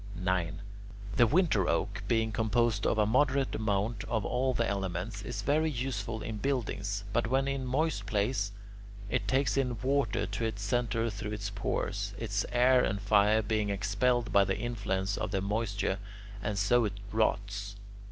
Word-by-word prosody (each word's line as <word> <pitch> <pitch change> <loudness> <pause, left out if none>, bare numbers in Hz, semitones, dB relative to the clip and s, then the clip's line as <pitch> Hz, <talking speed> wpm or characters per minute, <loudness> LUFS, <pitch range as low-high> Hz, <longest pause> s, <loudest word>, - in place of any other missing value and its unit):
9. 90 -2 -1 0.6
The 120 - +6
winter 155 - +3
oak, - - -1
being 115 -1 +1
composed 110 -1 +1
of - - +1
a 105 - +4
moderate 135 +4 +2
amount 105 0 -1
of 110 -3 -1
all 130 +2 +1
the 120 -2 0
elements, 95 0 -3
is 115 +4 -5
very 155 +3 +2
useful 115 -5 -3
in 110 - -4
buildings, 105 -5 -2
but 120 0 +1
when 135 +3 +1
in 135 -1 -1
a - - -4
moist 130 -5 0
place, 100 0 0 0.6
it - - 0
takes 130 -4 +2
in 125 -3 0
water 130 -6 +1
to 105 +3 -4
its 110 -3 -2
centre 115 +1 0
through 105 +1 -5
its 105 -1 -4
pores, 100 0 -2
its 105 -2 -2
air 125 +1 +5
and 100 - 0
fire 105 +1 +4
being 105 -1 0
expelled 110 +5 +1
by 100 - +6
the 95 0 -1
influence 100 -4 -2
of - - -2
the 100 -1 0
moisture, 100 -1 -1 0.4
and 105 0 -2
so 115 +4 +3
it 105 -2 -1 0.2
rots. 100 -2 -1
110 Hz, 170 wpm, -30 LUFS, 100-120 Hz, 0.6 s, The